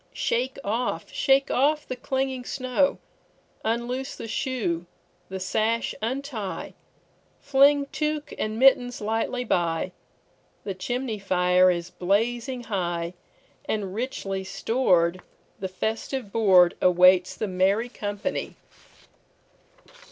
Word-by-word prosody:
Shake 255 +3 -1
off, 230 +5 -2
shake 275 0 +3
off 295 +3 +2
the 255 - -3
clinging 265 0 -2
snow; 255 +2 0 0.7
Unloose 240 +4 -2
the - - -7
shoe, 210 -9 -2 0.4
the 190 0 -5
sash 220 +5 0
untie, 235 -3 -4 0.7
Fling 280 +1 +4
tuque 300 -1 -2
and 215 0 -2
mittens 245 -1 +4
lightly 225 +4 -1
by; 175 -5 0 0.7
The 195 - -3
chimney 230 +4 -3
fire 180 -1 +4
is 175 0 -2
blazing 235 +6 0
high, 175 -5 -2 0.5
And, 200 -3 -2
richly 200 -5 -3
stored, 185 -4 +1 0.4
the 190 - -2
festive 220 +4 -3
boardAwaits 180 -3 +5
the 215 - -2
merry 195 +5 +1
company. 205 +3 -4
220 Hz, 100 wpm, -25 LUFS, 185-255 Hz, 0.7 s, boardAwaits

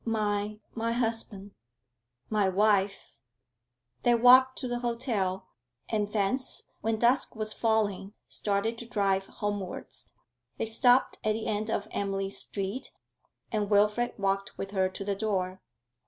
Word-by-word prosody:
My 210 -2 -1
my 230 0 -1
husband?' 225 -4 -2 0.8
'My 210 -3 +3
wife!' 200 0 +1 0.8
They 240 0 +4
walked 255 +2 +7
to 255 - -3
the 245 0 -2
hotel, 225 -6 -2 0.4
and 210 -2 -1
thence, 220 +6 0 0.2
when 220 0 0
dusk 240 +4 +3
was 215 0 -3
falling, 215 -3 0
started 210 +3 -1
to 235 - -8
drive 195 -3 +1
homewards. 205 -3 -5 0.5
They - - -1
stopped 245 +3 +3
at 215 - +2
the 220 0 -4
end 215 0 -1
of 205 -1 -1
Emily's 195 -1 -2
street, 200 +5 -2 0.6
and 210 -2 -1
Wilfrid 210 +3 +2
walked 195 -1 -1
with 195 - -5
her 190 -2 +1
to 195 +1 -7
the 200 - 0
door. 190 -3 -2
210 Hz, 135 wpm, -29 LUFS, 195-230 Hz, 0.8 s, walked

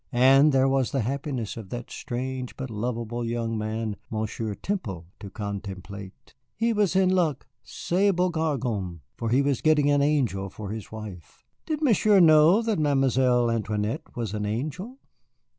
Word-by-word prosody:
And 135 +4 +6
there 135 -1 +3
was 135 -2 +1
the 135 - -1
happiness 130 -2 -3
of 110 -4 -8
that 120 +2 -6
strange 125 +1 -5
but 130 -3 -5
lovable 120 +1 -3
young 115 -1 -2
man, 110 -1 -3
Monsieur 110 -1 -3
Temple, 100 - -4
to 100 - -8
contemplate. 100 -1 -7 0.2
He 230 +1 +1
was 205 -4 +1
in 190 -1 +4
luck, 170 -7 +1 0.2
ce 195 +4 0
beau 180 0 +1
garçon, 120 - -2
for 115 - -3
he 130 +4 +3
was 140 -3 0
getting 150 -2 +4
an 145 0 +3
angel 125 -10 +1
for 100 +1 -7
his 110 -2 -7
wife. 105 -7 -10 0.2
Did 310 -1 -2
Monsieur 215 -6 +4
know 165 +5 +6
that 220 -5 0
Mademoiselle 130 -4 +2
Antoinette 105 -1 -2
was 115 -4 -3
an 105 -1 -2
angel? 155 - -4
125 Hz, 160 wpm, -26 LUFS, 110-150 Hz, 0.2 s, And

